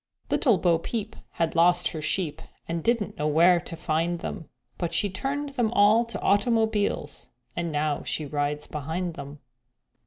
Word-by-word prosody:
_Little 235 - +3
Bo 165 0 +3
Peep 220 +3 -4 0.2
had 165 -1 0
lost 175 +1 +4
her 160 - -5
sheep, 160 -1 -1 0.3
And 165 -1 -3
didn't 230 -3 0
know 150 - +1
where 170 +4 +5
to 170 0 -7
find 165 +2 0
them; 165 0 -6 0.3
But 170 -1 -2
she 200 +4 +1
turned 280 +8 -2
them 245 -5 0
all 215 +2 +5
to 230 - -6
automobiles, 210 -6 +1 0.3
And 170 -1 -2
now 150 -1 0
she 155 - -3
rides 145 +1 -2
behind 160 +4 -3
them. 140 -2 -9
170 Hz, 160 wpm, -26 LUFS, 155-210 Hz, 0.3 s, where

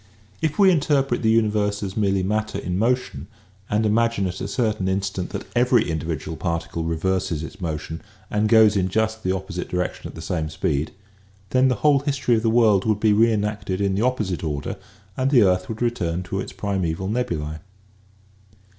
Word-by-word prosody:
If 155 -2 -1
we 195 -2 +6
in 170 - +3
terpret 135 -4 +1
the 110 - +2
universe 105 -2 +1
as 95 -1 -4
merely 100 -3 +1
matter 105 +1 -1
in 90 -2 -2
motion 115 - -1 0.4
and 105 +1 +1
imagine 115 -1 +2
at 90 -1 -4
a - - -2
certain 110 -6 -1
instant 95 -1 -2
that 100 +1 -5
every 120 -1 +3
individual 80 0 -3
par 85 0 -1
ticle 80 0 -5
reverses 85 -1 -1
its 95 +5 -9
motion 80 -1 -4 0.3
and 105 +1 +1
goes 110 -2 +6
in 95 -2 +1
just 110 +3 -1
the 95 - 0
opposite 95 -2 -4
direction 90 0 -3
at - - -11
the 80 - -8
same 80 -3 -2
speed, 75 0 -1 0.6
then 130 +1 +4
the 125 - +2
whole 145 -2 +6
history 135 -3 0
of 110 - +1
the 115 - +1
world 110 -4 +4
would 110 -2 +1
be 105 -1 +4
reenacted 105 -3 +1
in 100 -1 +1
the 100 - 0
opposite 110 -9 -1
order 75 -3 -3 0.4
and 130 +1 +1
the 125 -6 +6
earth 90 -1 +1
would 110 +1 -3
return 90 -7 -1
to 95 +1 -4
its - - -5
primeval 95 -2 -2
nebulae. 80 -9 -2
100 Hz, 190 wpm, -23 LUFS, 90-115 Hz, 0.6 s, we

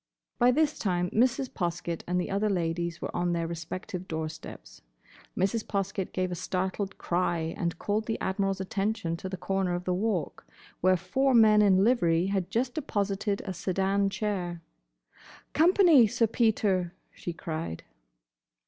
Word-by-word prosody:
By 245 - +6
this 305 +4 +2
time 180 -3 0
Mrs. 255 +3 +2
Poskett 170 -1 -3
and 180 +1 +1
the 180 - -3
other 205 +2 +1
ladies 170 -2 -2
were - - -4
on 175 0 0
their 170 -1 -1
respective 170 +2 -6
door 160 -2 -3
steps. - - -11 0.6
Mrs. 200 +4 +1
Poskett 195 -1 -2
gave 185 -1 -1
a 175 0 -4
startled 190 +2 -2
cry 170 -2 -1
and 175 -4 -2
called 210 +3 -1
the 225 - -2
Admiral's 195 0 -1
attention 195 -2 -1
to 190 - -6
the 190 - -5
corner 190 -1 -1
of 175 - -4
the 180 - 0
Walk, 185 - -2 0.3
where 185 +1 +4
four 265 +7 +1
men 215 -2 +7
in 195 -2 +5
livery 175 -8 +3
had 190 -2 -1
just 245 +4 0
deposited 205 -7 -1
a 190 - -3
sedan 195 +3 0
chair. 180 -5 -3 0.9
"Company, 330 - +6
Sir 230 +2 +2
Peter!" 205 -6 +1 0.2
she 175 - -5
cried. 160 - -5
190 Hz, 155 wpm, -28 LUFS, 175-215 Hz, 0.9 s, men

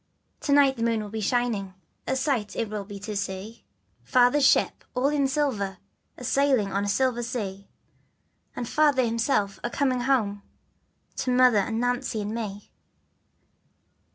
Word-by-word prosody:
To 285 - -2
night 280 -2 +5
the - - -5
moon 230 -2 +1
will 205 - -8
be 220 0 -4
shining, 215 -4 -1 0.3
A 265 - 0
sight 260 -6 -1
it 225 -2 -2
will 210 -2 -4
be 205 0 -8
to 210 0 -5
see, 200 +3 -5 0.4
Father's 255 +3 +4
ship - - +2
all 255 +3 +2
in 290 -2 +1
silver, 255 -9 -1 0.4
A'sail 260 -2 +2
on 200 +1 0
a - - -1
silver 250 +2 +1
sea, 205 -5 -5 0.9
And 240 - -4
Father 290 -3 +3
himself 225 -4 0
a 240 - -1
coming 255 0 0
ho 225 -6 +1 0.8
To - - -2
Mother 250 -3 +5
and 225 +3 -1
Nancy 245 -1 -1
and 210 +1 -3
me. 205 -3 -6
235 Hz, 155 wpm, -26 LUFS, 205-260 Hz, 0.9 s, night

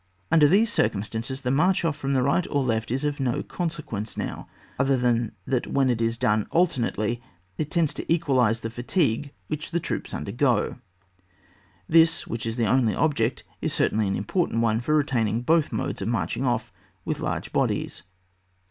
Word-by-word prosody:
Under 160 -3 +6
these 210 +7 +3
circumstances 110 +5 -1
the 125 - -1
march 175 +6 +2
off 160 -3 +1
from 135 0 -2
the 130 -2 +2
right 140 +6 +1
or 145 -2 +1
left 115 -3 -1
is 135 +5 -1
of 145 -1 -1
no 125 -3 0
conse 170 -2 -3
quence 110 -3 -5
now, - - -4 0.3
otherwise 135 -2 +2
than 120 -2 +2
that 130 -3 -1
when 135 -2 +2
it 115 -1 -1
is 115 0 0
done 105 -2 +1
alternately 120 -8 0 0.4
it 155 - -1
tends 165 -3 +1
to - - -5
equalise 130 -9 +2
the 115 - -4
fatigue 125 - 0 0.2
which 155 0 -4
the 170 - 0
troops - - -4
undergo. 120 - 0 1.1
This, 165 0 +4
which 115 0 -4
is 115 - -2
the 120 -2 +1
only 115 -1 +2
object, 130 -6 0 0.2
is - - -1
certainly 110 -1 +1
an 95 - 0
important 115 - 0
one 115 0 +2
for 150 +5 +1
retaining 120 -6 +1
both 160 +3 +3
modes - - -3
of - - -2
marching - - -1
off - - -1 0.3
with - - -2
large - - -3
bodies. - - -1
130 Hz, 180 wpm, -25 LUFS, 115-150 Hz, 1.1 s, Under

